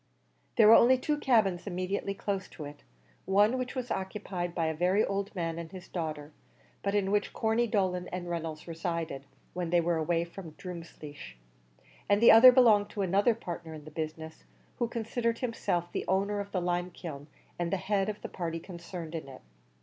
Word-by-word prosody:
There 220 Hz, -, +7 dB
were 220 Hz, -, +10 dB
only 250 Hz, +3 st, +7 dB
two 295 Hz, +3 st, -1 dB
cabins 205 Hz, -9 st, +2 dB
immediately 195 Hz, +2 st, -2 dB
close 195 Hz, -1 st, -3 dB
to 150 Hz, -, -9 dB
it; 145 Hz, 0 st, -10 dB, 0.4 s
one 205 Hz, +4 st, +4 dB
of 260 Hz, -, -1 dB
which 255 Hz, +1 st, -4 dB
was 250 Hz, -1 st, -4 dB
occupied 190 Hz, -3 st, -3 dB
by 165 Hz, -, 0 dB
a 160 Hz, -, 0 dB
very 180 Hz, +6 st, +2 dB
old 200 Hz, +1 st, -3 dB
man 165 Hz, -2 st, -2 dB
and 165 Hz, -1 st, -7 dB
his 185 Hz, -2 st, -10 dB
daughter, 155 Hz, -3 st, -4 dB, 0.5 s
but 200 Hz, +1 st, -1 dB
in 195 Hz, -1 st, +1 dB
which 205 Hz, 0 st, 0 dB
Corney 225 Hz, +2 st, +1 dB
Dolan 185 Hz, -4 st, 0 dB
and 180 Hz, -1 st, -5 dB
Reynolds 165 Hz, -2 st, -4 dB
resided, 165 Hz, -4 st, -3 dB, 0.3 s
when 175 Hz, -1 st, -3 dB
they 175 Hz, +1 st, +4 dB
were 170 Hz, 0 st, +1 dB
away 165 Hz, +1 st, +1 dB
from 170 Hz, -2 st, -10 dB
Drumleesh; 155 Hz, -, -9 dB, 0.7 s
and 205 Hz, 0 st, +4 dB
the 230 Hz, -, +8 dB
other 240 Hz, +3 st, +10 dB
belonged 220 Hz, -5 st, +5 dB
to 200 Hz, -, -3 dB
another 200 Hz, +5 st, +3 dB
partner 170 Hz, -6 st, -7 dB
in 150 Hz, -1 st, -11 dB
the 155 Hz, -, -10 dB
business, 160 Hz, 0 st, -6 dB, 0.4 s
who 240 Hz, -, +1 dB
considered 230 Hz, 0 st, -1 dB
himself 200 Hz, -8 st, -2 dB
the -, -, -3 dB
owner 200 Hz, +2 st, +1 dB
of 200 Hz, 0 st, -5 dB
the 185 Hz, -, -1 dB
limekiln, 175 Hz, -4 st, -3 dB, 0.3 s
and 170 Hz, -1 st, -1 dB
the 195 Hz, -, +1 dB
head 195 Hz, +2 st, 0 dB
of 210 Hz, 0 st, -6 dB
the -, -, -3 dB
party 165 Hz, -2 st, -4 dB
concerned 170 Hz, -2 st, -8 dB
in 160 Hz, -4 st, -5 dB
it. 135 Hz, -, -11 dB
180 Hz, 190 wpm, -30 LUFS, 165-205 Hz, 0.7 s, were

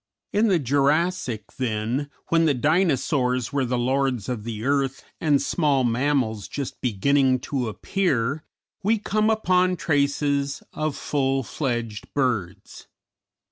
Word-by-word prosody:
In 215 Hz, +3 st, +3 dB
the 190 Hz, -4 st, +4 dB
Jurassic, 145 Hz, -, +1 dB, 0.2 s
then, 120 Hz, +4 st, -1 dB, 0.2 s
when 165 Hz, 0 st, +3 dB
the 150 Hz, -3 st, +3 dB
Dinosaurs 135 Hz, -4 st, +1 dB
were 140 Hz, -2 st, +1 dB
the 125 Hz, 0 st, -1 dB
lords 130 Hz, -2 st, 0 dB
of 115 Hz, -4 st, -4 dB
the 115 Hz, -1 st, -5 dB
earth 135 Hz, -1 st, 0 dB, 0.2 s
and 145 Hz, -3 st, +3 dB
small 145 Hz, -5 st, +1 dB
mammals 120 Hz, -3 st, 0 dB
just 140 Hz, -3 st, -5 dB
beginning 130 Hz, +4 st, +2 dB
to 130 Hz, -4 st, -2 dB
appear, 140 Hz, -, -1 dB, 0.4 s
we 215 Hz, +3 st, +2 dB
come 215 Hz, +1 st, +1 dB
upon 185 Hz, -4 st, +2 dB
traces 140 Hz, -2 st, 0 dB
of 155 Hz, -1 st, -2 dB
full 135 Hz, -2 st, 0 dB
fledged 120 Hz, -5 st, -3 dB
birds. 115 Hz, -10 st, -2 dB
140 Hz, 125 wpm, -24 LUFS, 125-155 Hz, 0.4 s, the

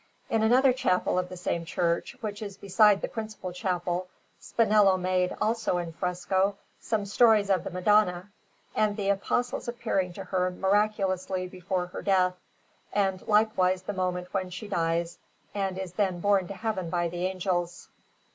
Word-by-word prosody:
In 225 Hz, -, +2 dB
another 250 Hz, +4 st, +5 dB
chapel 185 Hz, -7 st, +1 dB
of 180 Hz, 0 st, -3 dB
the 185 Hz, -, -8 dB
same 170 Hz, -1 st, -2 dB
church, 170 Hz, +5 st, -1 dB
which 210 Hz, -2 st, -5 dB
is 200 Hz, -2 st, -6 dB
beside 205 Hz, +1 st, +4 dB
the -, -, 0 dB
principal 215 Hz, -5 st, -6 dB
chapel, 180 Hz, 0 st, -2 dB, 0.3 s
Spinello 210 Hz, -4 st, +3 dB
made, 185 Hz, 0 st, 0 dB
also 220 Hz, -5 st, 0 dB
in 170 Hz, -2 st, -4 dB
fresco, 185 Hz, +3 st, 0 dB, 0.2 s
some 215 Hz, -3 st, -1 dB
stories 210 Hz, -1 st, +4 dB
of 185 Hz, -3 st, +2 dB
the -, -, -4 dB
Madonna, 185 Hz, 0 st, +2 dB, 0.4 s
and 210 Hz, -1 st, +1 dB
the 200 Hz, -1 st, -1 dB
Apostles 245 Hz, +6 st, -1 dB
appearing 225 Hz, -6 st, -1 dB
to 195 Hz, -, -7 dB
her 185 Hz, -1 st, 0 dB
miraculously 190 Hz, -1 st, 0 dB
before 180 Hz, 0 st, -3 dB
her 180 Hz, -, -7 dB
death, 185 Hz, -2 st, +2 dB, 0.6 s
and 195 Hz, -2 st, 0 dB
likewise 190 Hz, -4 st, +2 dB
the 205 Hz, -, -4 dB
moment 180 Hz, -1 st, -3 dB
when 190 Hz, -2 st, -1 dB
she 190 Hz, +4 st, -7 dB
dies 170 Hz, -2 st, -1 dB, 0.3 s
and 195 Hz, -2 st, -2 dB
is 190 Hz, -2 st, -5 dB
then 185 Hz, -2 st, 0 dB
borne 195 Hz, -1 st, +2 dB
to 200 Hz, -, -7 dB
Heaven 210 Hz, -6 st, -3 dB
by 175 Hz, 0 st, 0 dB
the 175 Hz, +2 st, -2 dB
Angels. 180 Hz, -2 st, -2 dB
190 Hz, 160 wpm, -28 LUFS, 180-210 Hz, 0.6 s, another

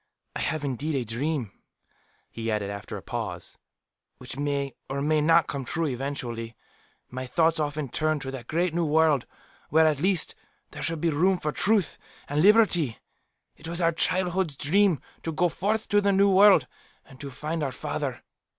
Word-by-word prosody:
I -, -, -3 dB
have 155 Hz, -2 st, -2 dB
indeed 140 Hz, +3 st, -2 dB
a 130 Hz, -3 st, -1 dB
dream," 120 Hz, 0 st, -2 dB, 0.8 s
he 115 Hz, 0 st, -4 dB
added, 105 Hz, -2 st, -1 dB
after 100 Hz, -2 st, -6 dB
a -, -, -10 dB
pause, -, -, -5 dB, 0.6 s
"which 125 Hz, 0 st, -8 dB
may, 140 Hz, -1 st, -2 dB, 0.2 s
or 135 Hz, +1 st, -2 dB
may 150 Hz, +2 st, +2 dB
not, 165 Hz, +1 st, +4 dB
come 140 Hz, -1 st, -4 dB
true 165 Hz, +6 st, -2 dB
eventually. 125 Hz, -4 st, -4 dB, 0.6 s
My 130 Hz, +1 st, -5 dB
thoughts 160 Hz, +4 st, +2 dB
often 150 Hz, -1 st, -2 dB
turn 155 Hz, +4 st, 0 dB
to 135 Hz, -, -5 dB
that 125 Hz, -3 st, -8 dB
great 170 Hz, +1 st, 0 dB
New 170 Hz, 0 st, 0 dB
World, 155 Hz, -3 st, +3 dB, 0.4 s
where, 160 Hz, +2 st, +5 dB
at 155 Hz, -3 st, +2 dB
least, 185 Hz, -1 st, +1 dB, 0.4 s
there -, -, -8 dB
should 165 Hz, -2 st, -2 dB
be 170 Hz, -, +2 dB
room 180 Hz, +6 st, +2 dB
for 150 Hz, -3 st, -2 dB
truth 205 Hz, +1 st, +1 dB, 0.3 s
and 145 Hz, +1 st, 0 dB
liberty. 185 Hz, -, +4 dB, 0.6 s
It -, -, -11 dB
was 170 Hz, +1 st, -1 dB
our 165 Hz, -1 st, +3 dB
childhood's 180 Hz, -1 st, 0 dB
dream, 180 Hz, +4 st, +3 dB, 0.2 s
to 165 Hz, -, -3 dB
go 175 Hz, +3 st, +1 dB
forth 210 Hz, +6 st, -1 dB
to 205 Hz, -1 st, +4 dB
the 200 Hz, 0 st, +2 dB
New 200 Hz, +1 st, +4 dB
World 195 Hz, -6 st, +6 dB, 0.4 s
and 130 Hz, -2 st, -16 dB
to 140 Hz, -, -6 dB
find 155 Hz, +5 st, -4 dB
our 140 Hz, -3 st, -1 dB
father. 135 Hz, 0 st, -4 dB
155 Hz, 180 wpm, -26 LUFS, 135-170 Hz, 0.8 s, World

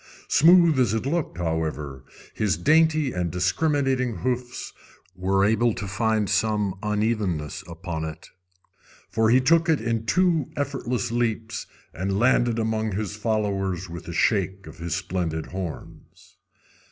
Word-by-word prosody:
Smooth 170 Hz, -2 st, +6 dB
as 115 Hz, -4 st, +2 dB
it 110 Hz, -, -2 dB
looked, 150 Hz, -, -2 dB
however, 75 Hz, -5 st, -3 dB, 0.3 s
his 100 Hz, -7 st, 0 dB
dainty 155 Hz, -, +3 dB
and 90 Hz, -1 st, -1 dB
discriminating 130 Hz, -, 0 dB
hoofs 125 Hz, +7 st, -3 dB, 0.4 s
were 95 Hz, +2 st, +2 dB
able 110 Hz, +2 st, +2 dB
to 100 Hz, -, -5 dB
find 110 Hz, +1 st, 0 dB
some 105 Hz, -3 st, +1 dB
unevennesses 105 Hz, -7 st, -1 dB
upon 85 Hz, -1 st, -5 dB
it, 80 Hz, -1 st, -8 dB, 0.8 s
for 110 Hz, 0 st, +2 dB
he 125 Hz, +3 st, +6 dB
took 165 Hz, +5 st, +3 dB
it 160 Hz, -, +3 dB
in 115 Hz, 0 st, -2 dB
two 165 Hz, -, +2 dB
effortless 130 Hz, -4 st, -2 dB
leaps, 115 Hz, -1 st, -2 dB, 0.3 s
and 95 Hz, +3 st, -2 dB
landed 120 Hz, 0 st, +3 dB
among 110 Hz, -1 st, -1 dB
his 105 Hz, 0 st, -3 dB
followers 100 Hz, -4 st, -1 dB
with 85 Hz, -, -8 dB
a 85 Hz, -, -5 dB
shake 95 Hz, 0 st, +1 dB
of 80 Hz, 0 st, -12 dB
his 85 Hz, 0 st, -2 dB
splendid 85 Hz, -3 st, -2 dB
horns. 90 Hz, -3 st, -8 dB
110 Hz, 135 wpm, -25 LUFS, 90-125 Hz, 0.8 s, Smooth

